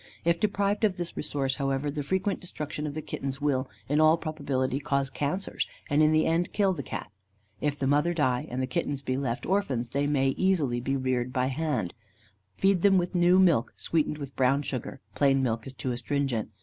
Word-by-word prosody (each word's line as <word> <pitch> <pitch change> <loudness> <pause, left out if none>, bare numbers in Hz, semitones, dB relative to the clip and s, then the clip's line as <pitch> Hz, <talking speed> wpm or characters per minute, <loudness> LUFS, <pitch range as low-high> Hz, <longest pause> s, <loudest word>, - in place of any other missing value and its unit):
If 170 0 +3
deprived 205 +1 0
of 200 -3 +2
this 175 -1 -4
resource, 140 -3 -2
however, 135 0 -1
the 145 0 -3
frequent 190 +6 -1
destruction 150 -4 -5
of 145 - -5
the 155 - -4
kittens 135 0 -4
will, 135 -3 0 0.2
in 150 +3 +2
all 155 +1 +6
probability, 140 -5 -2
cause 140 -1 -1
cancers, 150 +9 -2 0.2
and 145 +1 +4
in 155 0 +5
the 155 0 +3
end 170 +2 +1
kill 195 -2 +3
the 155 - -4
Cat. 105 - -6 0.5
If 145 -1 -1
the 140 - -1
mother 145 +5 +3
die, 130 -7 0
and 130 +2 -2
the - - +2
kittens 135 +2 -2
be 130 - -1
left 130 -2 -2
orphans, 135 -12 0
they 140 +1 0
may 135 -2 +2
be - - -4
easily 145 -11 +2
reared 130 -1 -1
by 130 0 0
hand. 135 - -1 0.6
Feed 195 - +3
them 195 0 +5
with 175 0 0
new 175 0 +5
milk, 170 -11 +4
sweetened 155 -2 0
with 140 -2 -7
brown 135 +2 +2
sugar 135 0 -5
plain 135 -1 +3
milk 115 -2 -1
is 135 - -7
too 130 +1 -3
astringent. 125 -1 -1
145 Hz, 200 wpm, -28 LUFS, 130-170 Hz, 0.6 s, all